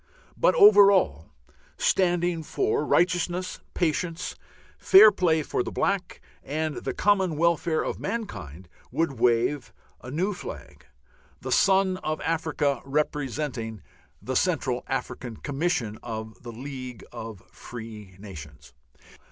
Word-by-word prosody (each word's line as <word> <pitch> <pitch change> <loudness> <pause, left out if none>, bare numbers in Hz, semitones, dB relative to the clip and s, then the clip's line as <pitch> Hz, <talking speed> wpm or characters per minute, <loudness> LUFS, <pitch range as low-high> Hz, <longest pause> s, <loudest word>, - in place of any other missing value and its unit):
But - - +3
over 405 - +8
all, 80 - +1 0.5
standing 175 -2 +1
for 415 - 0
righteousness, 180 +1 +1 0.2
patience, 170 +1 -1 0.5
fair 210 +3 +8
play 165 -5 +1
for 125 - -1
the - - -4
black, 195 -2 -1 0.2
and 155 +1 -3
the - - -4
common 190 -6 +2
welfare 170 0 +1
of - - -4
mankind 95 - -5 0.2
would 155 -7 -1
wave 120 +4 +1 0.3
a 125 - -9
new 180 +9 -1
flag, 180 - -10 0.5
the - - -6
Sun 190 -1 +3
of 155 -4 -3
Africa 160 -3 0
representing 135 -5 -2 0.4
the - - -4
Central - - 0
African 120 -3 -4
Commission 140 -7 -2
of 110 -2 -7
the 120 - -8
League 130 -1 -8
of 110 -4 -8
Free 110 -5 -10
Nations. 75 -8 -11
150 Hz, 120 wpm, -26 LUFS, 115-180 Hz, 0.5 s, over